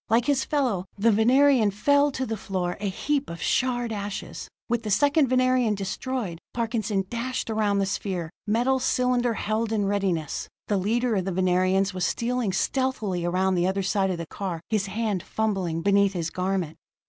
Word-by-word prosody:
Like 230 +2 +3
his 280 -2 +2
fellow, 250 - 0
the 225 +3 +4
Venerian 245 +2 +4
fell 285 +8 +3
to 265 - -2
the 225 - -3
floor, 185 -3 -3
a 205 -1 -1
heap 275 +8 -1
of 170 0 -7
charred 245 +4 0
ashes. 205 -1 -5 0.2
With 240 -1 0
the 215 - -5
second 285 +8 +3
Venerian 255 -3 +2
destroyed, 200 -1 -4 0.2
Parkinson 220 -4 -1
dashed 235 +2 -3
around 210 -2 +1
the 195 - +2
sphere, 185 -4 -3 0.2
metal 245 +5 +2
cylinder 250 -2 +1
held 215 +2 -1
in 210 -2 +1
readiness. 190 -7 -1 0.2
The 205 - +2
leader 230 +5 +1
of 185 - -1
the 195 - -1
Venerians 185 +2 +2
was 185 -1 -3
stealing 240 -3 -1
stealthily 215 -3 -1
around 185 +2 +1
the 175 0 +2
other 195 +1 0
side 195 0 +1
of 180 - -2
the 170 - -5
car, 180 0 -4
his 210 -2 +1
hand 210 -2 -1
fumbling 190 -5 -2
beneath 200 0 +3
his 165 -3 -3
garment. 185 -3 -2
205 Hz, 175 wpm, -25 LUFS, 190-245 Hz, 0.2 s, the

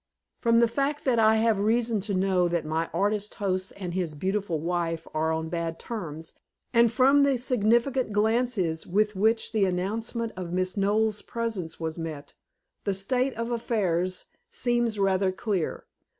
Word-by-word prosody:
From 230 0 +4
the 235 - +5
fact 280 +5 -2
that 245 -4 +3
I 220 0 +5
have 220 -2 +2
reason 225 +1 +1
to 200 - 0
know 185 -1 +2
that 170 -2 -1
my 160 +2 -1
artist 205 +1 -1
host 185 -2 -2
and 180 -3 -5
his 175 -4 -2
beautiful 190 0 -1
wife 165 0 -2
are 160 +1 +1
on 160 0 -2
bad 165 -1 -3
terms, 165 -9 -6 0.4
and 235 -1 +5
from 270 +4 +5
the 280 -2 +3
significant 240 +1 +1
glances 210 -6 0
with 210 +3 +1
which 220 +4 +2
the 215 -3 +2
announcement 220 +5 -2
of 180 -2 -5
Miss 185 0 0
Knowles' 210 +1 +1
presence 225 -8 -4
was 160 0 -4
met, 155 -3 -6 0.5
the 200 - 0
state 250 +7 0
of 230 +1 -3
affairs 185 -6 -1 0.2
seems 240 - 0
rather 195 -1 +2
clear. 190 -2 -2
205 Hz, 160 wpm, -27 LUFS, 180-230 Hz, 0.5 s, the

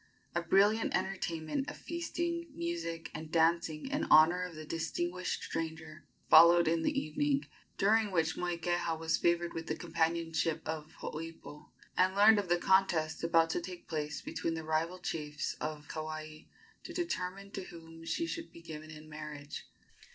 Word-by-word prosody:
A 170 - +1
brilliant 200 +6 +3
entertainment 190 - -2
of - - -8
feasting, 340 0 -3
music 335 - -3
and 155 0 -7
dancing 165 0 +2
in 290 +2 0
honor 160 +4 +6
of 180 -2 -5
the 155 0 -7
distinguished 175 +3 -2
stranger 160 -1 -5 0.2
followed 170 +1 +8
in 165 0 +2
the - - +1
evening, 280 - 0 0.3
during 215 +2 +4
which 165 -4 +1
Moikeha 175 -1 -1
was 160 0 +1
favored 170 0 +2
with 165 0 -5
the 155 - -1
companionship 165 -1 0
of 155 -1 -4
Hooipo, 160 -1 -7 0.3
and 185 +1 +3
learned 210 +1 +7
of 195 -3 -3
the 175 - +4
contest 175 -4 +2
about 165 0 +4
to - - -1
take 180 0 -8
place 150 -2 -3
between 165 - -2
the 160 - -4
rival 160 +3 0
chiefs 150 -4 -3
of 155 -1 -4
Kauai 155 0 -6 0.4
to 345 - -8
determine 195 - -3
to 195 - -5
whom 165 -1 -11
she 330 - -1
should 330 0 -5
be 170 - -13
given 155 -1 -8
in 155 0 -10
marriage. 150 -2 -7
165 Hz, 160 wpm, -33 LUFS, 160-185 Hz, 0.4 s, followed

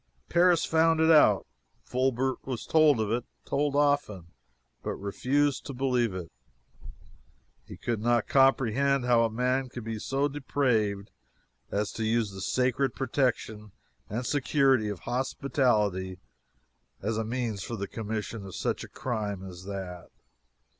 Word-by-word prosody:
Paris 175 -1 +4
found 160 0 +3
it 160 0 +5
out. 155 -2 +5 0.4
Fulbert 130 0 -1
was 130 -4 -5
told 155 -5 +4
of 110 -1 -1
it 120 +1 0 0.2
told 145 0 0
often 145 - +1 0.5
but - - -3
refused 135 +8 0
to 140 - -7
believe 125 -5 +1
it. 90 -3 -6 1.4
He - - -10
could 115 -3 -2
not 120 -1 +2
comprehend 135 0 +3
how 120 -1 +4
a 115 - +2
man 125 +3 0
could 120 -1 -7
be 110 -1 -4
so 135 +5 0
depraved 125 -8 0 0.6
as 105 +1 -1
to 115 - -4
use 110 -1 +1
the 95 0 -8
sacred 130 +3 0
protection 115 -6 -1 0.4
and 120 +5 -3
security 135 -4 +2
of 100 -4 -5
hospitality 120 - 0 0.9
as 110 +2 -1
a - - 0
means 115 -3 -3
for 115 - -5
the 100 -2 -4
commission 110 0 -5
of 95 -2 -9
such - - -2
a - - -8
crime 105 -6 -3
as 90 0 -10
that. 95 -3 -6
120 Hz, 140 wpm, -28 LUFS, 105-135 Hz, 1.4 s, it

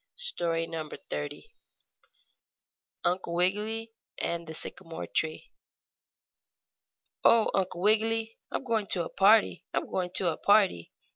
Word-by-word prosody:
STORY 170 - -2
XXX 155 - -6 1.6
UNCLE 175 -1 0
WIGGILY 215 +5 0 0.2
AND 170 -1 -3
THE 160 - -7
SYCAMORE 165 0 -4
TREE 155 0 -1 1.7
"Oh, 230 -1 +5
Uncle 185 -2 -1
Wiggily, 225 +1 +2
I'm - - -3
going 225 -5 0
to 175 -3 -1
a - - -6
party! 210 +3 +4
I'm - - 0
going 180 -1 -2
to 180 - +3
a - - -9
party!" 200 - +3
190 Hz, 115 wpm, -29 LUFS, 165-220 Hz, 1.7 s, Oh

